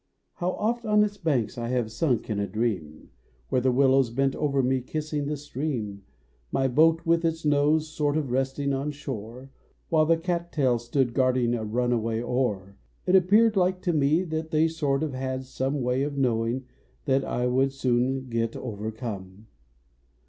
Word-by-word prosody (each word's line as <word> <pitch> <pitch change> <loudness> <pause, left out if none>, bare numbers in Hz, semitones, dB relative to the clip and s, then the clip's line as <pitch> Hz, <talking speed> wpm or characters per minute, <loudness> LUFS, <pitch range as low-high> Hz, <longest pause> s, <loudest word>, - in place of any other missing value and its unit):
How 180 0 -1
oft 235 +3 -1
on 210 -1 +4
its 205 -1 -2
banks 140 - -1
1 120 0 -3
have 120 -3 -1
sunk 125 0 0
in 105 -2 -2
a 100 - -1
dream, 95 -8 -3 0.4
Where 130 - +1
the 130 +1 +2
willows 135 -1 +4
bent 135 +3 0
over 140 -3 +1
me 130 +1 +1
kissing 150 +2 -3
the 150 0 -2
stream 130 -8 -4 0.5
My 135 - +1
boat 160 +5 +3
with 165 0 +2
its 165 -1 -1
nose 150 +2 +3
sort 150 -1 -1
of 145 -5 -2
resting 135 +2 0
on 135 +2 -1
slioi 125 -4 -7
e, - - -13 0.4
\Vhile 155 -1 +4
the 165 0 +4
cattails 165 -8 -1
stood 120 0 0
guarding 125 -2 +2
a 115 -2 -2
runaway 115 0 0
oar 115 -6 -2 0.3
It 180 - +3
appeared 210 +5 +5
like 185 -1 +2
to 175 -2 +1
me, 155 +3 +3
that 160 -2 -4
they 160 0 +3
sort 150 -3 -1
of 150 -4 -3
had 130 0 -3
some 135 +2 -2
Way 125 +2 +1
of 140 0 -2
knowing 120 0 0 0.4
that 135 -2 +2
I 125 - -1
would 130 +2 +2
soon 130 0 0
get 115 -1 -1
overcome. 105 -3 -6
135 Hz, 175 wpm, -26 LUFS, 120-155 Hz, 0.5 s, appeared